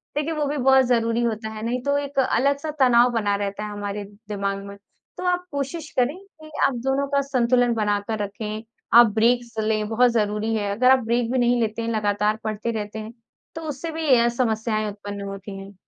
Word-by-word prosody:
देखिए 300 +2 -1
वो 305 -2 -1
भी 290 +1 -2
बहुत 265 0 +5
ज़रूरी 230 -1 +1
होता 220 -1 -2
है, 215 0 -7
नहीं 245 +2 -1
तो 280 +1 +1
एक 285 -1 -2
अलग-सा 280 +4 +1
तनाव 245 -2 +5
बना 210 -4 0
रहता 200 +1 -3
है 210 - -6
हमारे 205 0 -4 0.3
दिमाग़ 200 -1 -2
में। 200 0 -9 0.4
तो - - -5
आप 360 0 0
कोशिश 285 +3 -4
करें 255 +5 +2 0.3
कि 310 0 -12 0.2
आप - - -2
दोनों 275 +1 +1
का 280 0 +1
संतुलन 245 -3 +2
बना 210 -2 +1
कर 220 -1 -2
रखें। 210 +2 -5 0.4
आप 240 - +8
ब्रेक्स 235 +2 +2
लें 215 -1 0
बहुत 245 +2 +4
ज़रूरी 215 0 0
है। 205 -2 -1
अगर 250 +5 +4
आप 265 - +6
ब्रेक 235 +1 0
भी 260 - +1
नहीं 245 0 +3
लेते 225 0 -1
हैं 230 - -2
लगातार 210 0 +1
पढ़ते 215 +2 -2
रहते 215 -1 -5
हैं 215 +2 -8 0.4
तो 325 - -5
उससे 300 +4 -5
भी 320 0 -3
अ, 235 - +4
समस्याएँ 220 -2 -1
उत्पन्न 205 0 -7
होती 195 0 -7
हैं। 195 +1 -10
230 Hz, 210 wpm, -23 LUFS, 210-265 Hz, 0.4 s, आप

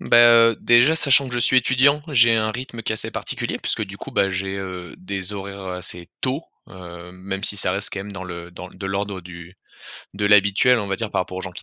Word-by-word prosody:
Bah, 115 -1 +6
heu, - - -10
déjà 120 +7 +5
sachant 140 -4 +4
que 125 - -7
je - - 0
suis 130 +2 +3
étudiant. 130 +4 +3
J'ai 120 -5 +4
un 110 -1 +1
rythme 120 -1 -7
qui - - -2
est - - -1
assez 110 - -3
particulier - - -4
puisque - - -2
du 100 -1 -7
coup, - - -9
bah, 95 0 +2
j'ai, 95 +1 -3
heu, 90 -3 -7
des 95 +1 -3
horaires, 100 0 -7
heu, 90 - -4
assez 90 -1 -8
tôt, 135 +4 -2 0.3
hem, 90 -1 -11
même 95 +1 -6
si 100 - -1
ça 90 -2 +1
reste 100 +2 -3
quand 100 - -4
même 100 +1 -8
dans 95 -1 -7
le 85 -1 -8
dans 90 +1 -10
de 95 +1 -8
l'ordre 100 0 -3
du 85 +1 -12 0.6
de 105 +1 -3
l'habituel 105 +4 +4
on 105 - -3
va 95 - -2
dire 110 0 -4
par - - 0
rapport 90 0 -6
aux - - -4
gens 95 - -5
qui 90 - -10
100 Hz, 255 wpm, -21 LUFS, 95-115 Hz, 0.6 s, Bah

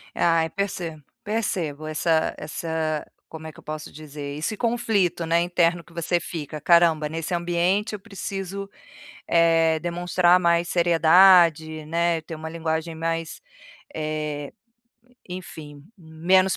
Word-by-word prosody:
Ai, 165 -1 +2
percebo. 175 -6 -4 0.2
Percebo, 180 -9 -2
essa 160 +1 +1
essa 155 0 -3 0.2
como 160 -1 -9
é 160 - -6
que 145 - -16
eu - - -17
posso 155 0 -6
dizer? 145 -1 -8
Esse 160 +8 -2
conflito, 205 -7 0
né, 165 +1 +2
interno 175 -1 +1
que - - -21
você 170 +1 0
fica, 155 -3 -6
"Caramba, 165 -2 +4
nesse 165 +3 -4
ambiente 175 +5 0
eu 210 - -4
preciso, 195 0 -6 0.6
eh, 165 -1 +4
demonstrar 175 +1 +2
mais 170 -1 +2
seriedade, 170 -2 +5
né, 170 +1 0
ter 160 - -9
uma 160 0 -6
linguagem 160 0 -3
mais, 165 0 -3 0.5
eh, 150 -2 -4 0.8
enfim, 155 -5 -9
menos 180 +3 +2
165 Hz, 125 wpm, -24 LUFS, 155-175 Hz, 0.8 s, seriedade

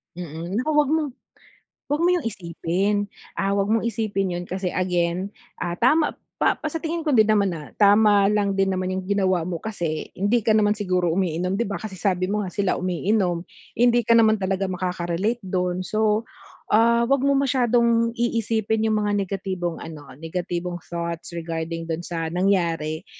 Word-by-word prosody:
Mm, 170 0 -6
naku 305 - -3
'wag 295 -2 +4
mong 315 -2 +1 0.8
'wag 295 +3 0
mo 345 - +4
yung 355 -8 +1
isipin. 195 +1 -1 0.3
Ah, 195 0 +1
'wag 200 +1 0
mong 225 +1 +2
isipin 205 -5 -1
yun 175 0 -4
kasi 190 +1 -3
again, 180 +1 0 0.3
ah, 175 0 -3
tama 300 +6 +4 0.3
pa - - +3
pa - - -5
sa 325 - -3
tingin 330 0 -3
ko 300 - +2
din 220 -2 +5
naman 200 -3 +3
na 155 -3 -7
tama 205 0 +5
lang 200 -2 +1
din 195 - +3
naman 185 0 -1
yung 185 0 -3
ginawa 190 -3 +1
mo 175 -3 -4
kasi 170 -8 -3
hindi 205 +5 +2
ka 220 - +1
naman 210 -1 +4
siguro 185 -4 0
umiinom 180 -1 0
'di 235 +4 0
ba, 200 - -2
kasi 215 -3 -7
sabi 185 -3 +1
mo 210 - 0
nga 190 - -4
sila 195 0 0
umiinom 180 -1 0 0.3
hindi 240 0 +5
ka 230 +1 +4
naman 220 -2 +4
talaga 190 +1 0
makaka-relate 180 +3 -2
dun. 180 0 -1
So, 215 +2 +1 0.5
ah, 235 +2 +4
'wag 275 +1 +2
mo 280 0 +3
masyadong 240 -3 +2
iisipin 220 -2 0
yung 215 - +2
mga 205 -1 0
negatibong 185 -3 -3
ano, 155 -2 -8 0.2
negatibong 175 +1 -4
thoughts 170 -1 -5
regarding 165 0 -4
dun 165 +1 -3
sa 165 -2 -3
nangyari. 170 -2 0
195 Hz, 175 wpm, -23 LUFS, 175-220 Hz, 0.8 s, din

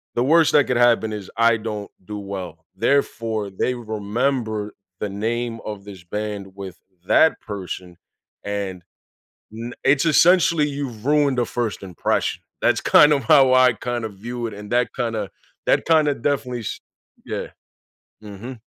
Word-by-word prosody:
The 120 - +2
worst 160 +3 +4
that 145 - +5
could 125 - 0
happen 120 -2 +3
is 100 -3 -7
I 115 -1 +4
don't 105 -2 -5
do 105 +1 -6
well. 90 -5 -7
Therefore, 115 -5 0
they 110 +6 -1
remember 110 0 -2 0.3
the 105 - -1
name 115 +3 -2
of 105 -2 -6
this 95 -4 -11
band 100 -1 -5
with 95 -2 -8 0.3
that 160 - +4
person, 90 -3 -7 0.5
and 100 -3 -4 0.7
n 115 +2 -7
it's 135 +4 +3
essentially 165 -1 +5
you've 135 -6 -5
ruined 145 -3 +3
a - - +2
first 120 -4 -3
impression. 90 -3 -1 0.2
That's - - +3
kind 150 0 +6
of 140 -5 +1
how 135 0 +6
I 130 -2 +5
kinda 120 -1 -3
view 120 +4 -6
it. 110 - -6
And 105 +1 -10
that 125 0 +2
kinda 115 -5 -2 0.4
that - - +3
kinda 155 -3 +4
definitely 125 -2 -2
s 110 - -5 0.5
yeah. - - -4 0.8
Mhm. 110 +4 -9
115 Hz, 150 wpm, -22 LUFS, 100-130 Hz, 0.8 s, kind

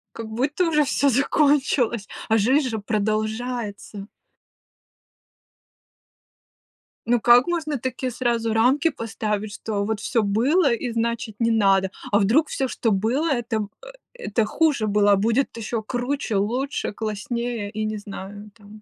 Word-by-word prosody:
Как 230 -1 -6
будто 270 +10 0
уже 300 -2 +3
всё 280 0 +2
закончилось, 275 -4 +2 0.2
а 225 - +4
жизнь 260 +6 +2
же 225 - -3
продолжается. 215 0 -3 3.0
Ну 240 +1 +2
как 240 +3 +6
можно 320 -4 -1
такие 255 0 -3
сразу 235 -2 -1
рамки 260 +8 +3
поставить, 215 -5 -3
что 210 -2 -3
вот 215 0 -2
всё 230 +1 0
было, 260 - +2
и 235 +1 -2
значит 230 -1 -2
не 230 -1 +2
надо, 195 -3 +3 0.2
а 205 - +4
вдруг 240 +11 +3
всё, 270 - -2
что 230 -2 -1
было, 230 +11 +1
это 230 -5 -1 0.2
э - - -11 0.3
это 225 - -1
хуже 290 -1 +1
было, 205 0 +3
а - - +6
будет 230 +6 0
ещё 225 0 -3
круче, 245 0 -2
лучше, 240 +7 -1
класснее, 220 +1 -3
и 215 +1 -3
не 215 0 -3
знаю 205 +1 -9
там. 210 -1 -15
230 Hz, 140 wpm, -23 LUFS, 210-260 Hz, 3.0 s, как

